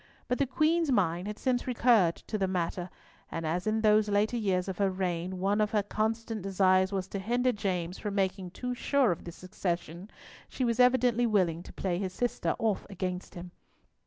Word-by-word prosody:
But 250 - -1
the 280 - +2
Queen's 310 +3 +2
mind 180 -5 +1
had 210 0 -5
since 255 -1 0
recurred 230 -8 +4
to 215 - -5
the 190 - +1
matter, 180 0 -2 0.4
and 165 0 -4
as 175 +5 -1
in 220 +1 +1
these 215 -1 +4
later 205 +3 +2
years 190 -5 0
of 190 -1 -5
her 200 -1 +3
reign 185 -1 -2
one 200 +3 +1
of 210 - +2
her 210 -1 +1
constant 220 +1 -2
desires 190 0 +3
was 190 -2 -2
to 200 - -4
hinder 245 +5 +1
James 185 -5 -3
from 205 -2 -4
making 190 -2 -1
too 250 +7 -4
sure 265 -1 +2
of 170 - -5
the 170 - -6
succession, 180 0 -4 0.4
she 255 - -2
was 235 0 0
evidently 250 -1 +4
willing 180 -6 +1
to - - -11
play 180 -2 -2
his 190 -2 -3
sister 245 +5 -1
off 220 -4 -1
against 185 -1 -4
him. 175 0 -8
200 Hz, 195 wpm, -29 LUFS, 180-230 Hz, 0.4 s, recurred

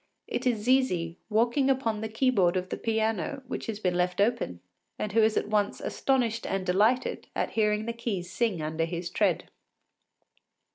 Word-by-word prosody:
It 255 - -2
is 225 -4 +1
Zizi 185 -10 +1
walking 240 +5 +2
upon 230 -5 0
the 220 - -3
key 255 +4 +2
board 185 -6 +3
of 185 0 -3
the - - -3
piano 225 +5 -1
which - - -5
has 215 -2 -3
been 180 -4 0
left 180 +1 0
open, 205 - +1 0.4
and 210 - -3
who 225 +2 +4
is 220 0 +3
at - - 0
once 210 -1 0
astonished 240 -4 0
and 195 -1 -2
delighted 210 +7 +2
at - - -1
hearing 210 -1 +1
the 235 - -2
keys 215 -6 -3
sing 210 -9 0
under 160 +1 -1
his 170 +1 -4
tread. 195 -6 +1
215 Hz, 180 wpm, -28 LUFS, 185-235 Hz, 0.4 s, who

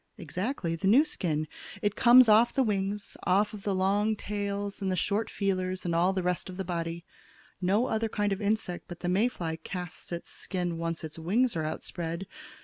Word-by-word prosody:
"Exactly; 180 - -3
the 180 +4 -1
new 260 +10 +6
skin. 155 - -1 0.4
It 205 0 +1
comes 245 0 +8
off 220 +2 +6
of - - -20
the 270 - +4
wings, 205 -2 -1
off 205 +3 +2
of 210 - -7
the 195 -1 -1
long 205 +3 +2
tails 200 -1 -3
and 190 -1 0
the - - +1
short 205 +5 0
feelers, 185 -2 -1
and 170 - 0
all 175 +3 +3
the 190 -1 -1
rest 180 +1 -1
of 180 - -8
the 190 - -3
body. 170 -1 -3 0.6
No 200 +6 +3
other 225 -2 0
kind 205 -1 0
of 195 - -5
insect 205 -4 -1
but 175 -1 -9
the 175 - -2
May 200 +6 +3
fly 165 -9 -4
casts 180 +2 -7
its 170 0 -5
skin 175 -3 -3
once 165 0 -3
its 160 +1 -7
wings 220 +9 +1
are 160 -1 -1
outspread. 170 +3 -4
190 Hz, 205 wpm, -29 LUFS, 175-210 Hz, 0.6 s, comes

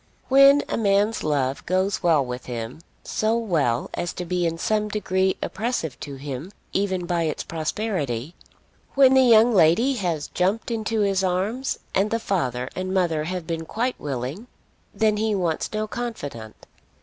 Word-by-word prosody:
When 275 +2 +7
a - - -2
man's 205 +1 +2
love 140 -3 0
goes 185 +2 +1
well 160 -6 +3
with 125 0 -6
him, 120 +2 -5 0.2
so 220 +1 0
well 155 - 0
as 175 - -3
to 180 - -5
be 175 0 0
in 165 0 -3
some 210 +4 0
degree 190 -2 0
oppressive 200 - -3
to 140 -2 -7
him 140 +5 -6 0.2
even 190 -2 0
by 170 -1 0
its 155 - -2
prosperity, 160 - -3 0.6
when 270 -1 +6
the 265 - +6
young 235 -1 +6
lady 190 - +4
has 170 -7 -2
jumped 195 +6 0
into 220 -1 -1
his 195 -1 +1
arms 195 +8 -1 0.2
and 200 +2 +2
the 230 - +1
father 130 - -1
and 185 0 -3
mother 165 -5 +1
have 180 0 -4
been 165 -1 -3
quite 245 +3 -2
willing, 140 - -4 0.4
then 215 -1 +1
he 215 0 +1
wants 170 -5 -1
no 215 0 -1
confidant. 145 - -6
185 Hz, 160 wpm, -24 LUFS, 155-215 Hz, 0.6 s, When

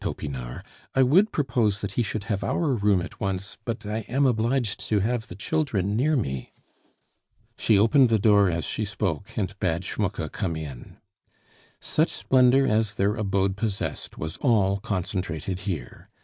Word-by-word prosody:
Topinard. 65 -4 -5 0.3
"I 135 - +5
would 185 - +4
propose 115 -8 +1
that 100 - -3
he 120 - 0
should 110 -2 -2
have 100 -1 -2
our 155 -5 0
room 100 -5 +2
at 90 - -9
once, 95 +1 -3
but 115 -2 -4
I 105 +2 -2
am 135 +4 +2
obliged 120 -2 +1
to 105 - +3
have 115 +2 -1
the 90 - -9
children 105 - -1
near 150 +7 +2
me." 65 - -3 1.0
She 110 - +3
opened 120 +5 +5
the 110 - +4
door 100 -2 +5
as 85 -3 -2
she 110 - -2
spoke, 100 -3 -3
and 100 -3 -1
bade 85 0 0
Schmucke 95 -8 -2
come 90 -6 -2
in. 75 -6 -8 0.8
Such 155 +2 +1
splendor 130 +1 +4
as 110 -3 +1
their 100 +2 +1
abode 100 -3 0
possessed 105 -2 -3
was 80 +1 -5
all 100 -6 +2
concentrated 90 -3 -3
here. 75 -10 -6
105 Hz, 165 wpm, -25 LUFS, 95-120 Hz, 1.0 s, I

